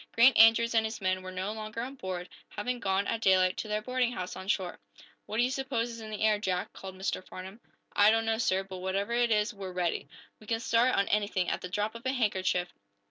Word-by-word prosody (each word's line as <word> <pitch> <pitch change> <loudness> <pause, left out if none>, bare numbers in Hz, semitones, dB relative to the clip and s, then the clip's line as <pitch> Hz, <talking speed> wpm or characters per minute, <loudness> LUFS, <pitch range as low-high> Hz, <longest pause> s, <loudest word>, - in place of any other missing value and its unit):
Grant 235 +2 +6
Andrews 225 +1 +6
and 225 -1 +4
his 220 0 -4
men 185 -1 0
were 185 0 -7
no 185 +3 -3
longer 215 +1 -5
on 255 +3 -5
board, 185 -7 -5 0.2
having 245 +4 -3
gone, 195 -1 0
at 230 +1 -2
daylight, 185 -2 +4
to - - -4
their 210 0 -2
boarding 250 0 0
house 185 -4 -5
on 190 - -8
shore. 190 -3 -1 0.5
"What 215 - -4
do 240 - +4
you 250 - +1
suppose 260 -3 -2
is 230 - -8
in 220 - -8
the 215 -1 -6
air, 215 -1 +3
Jack?" 185 -3 -2
called 190 -1 -9
Mr. 190 0 -3
Farnum. 190 +4 -9 0.4
"I 205 +1 +7
don't 225 +1 +2
know, 225 0 0
sir. 190 -4 +1
But 190 -1 -8
whatever 195 +4 -2
it 240 0 +2
is, 215 +1 +2
we're 195 -2 -7
ready. 180 -2 -1 0.3
We 215 - -16
can 225 0 0
start, 235 +2 +3
on 200 - +2
anything, 205 -3 +1
at - - -2
the 180 - -6
drop 210 +3 -1
of 230 0 -10
a 260 - +1
handkerchief. 190 -7 0
210 Hz, 245 wpm, -30 LUFS, 190-230 Hz, 0.5 s, I